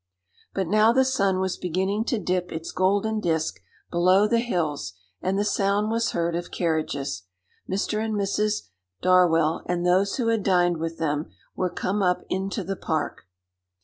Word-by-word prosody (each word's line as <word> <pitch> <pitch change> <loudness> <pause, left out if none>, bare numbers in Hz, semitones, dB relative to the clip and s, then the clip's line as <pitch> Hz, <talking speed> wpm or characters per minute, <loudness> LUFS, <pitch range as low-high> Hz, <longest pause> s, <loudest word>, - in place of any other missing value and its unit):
But 190 - 0
now 215 +5 +4
the 260 +2 +3
sun 195 -8 +1
was 190 -1 -1
beginning 190 +5 -1
to 245 - 0
dip 180 -2 -1
its 160 +1 -5
golden 205 +4 +1
disc 160 -4 -1 0.3
below 185 +4 +4
the 230 +1 +2
hills, 165 - -2 0.3
and 190 +1 0
the 205 - +1
sound 205 +1 +1
was 230 0 +1
heard 170 0 0
of 175 - -4
carriages. 145 - -2 0.4
Mr. 215 +3 -1
and 220 -1 -2
Mrs. 210 - -1 0.3
Darwell, 170 -3 +4
and 175 0 -1
those 190 +3 +3
who 235 -3 0
had 225 -2 +1
dined 175 -3 +2
with 165 +1 -4
them, 150 -1 -1 0.3
were 185 - 0
come 190 +3 -2
up 180 -1 +1
into 195 +2 -2
the 195 +2 -3
park. 155 - -3
185 Hz, 165 wpm, -25 LUFS, 170-210 Hz, 0.4 s, now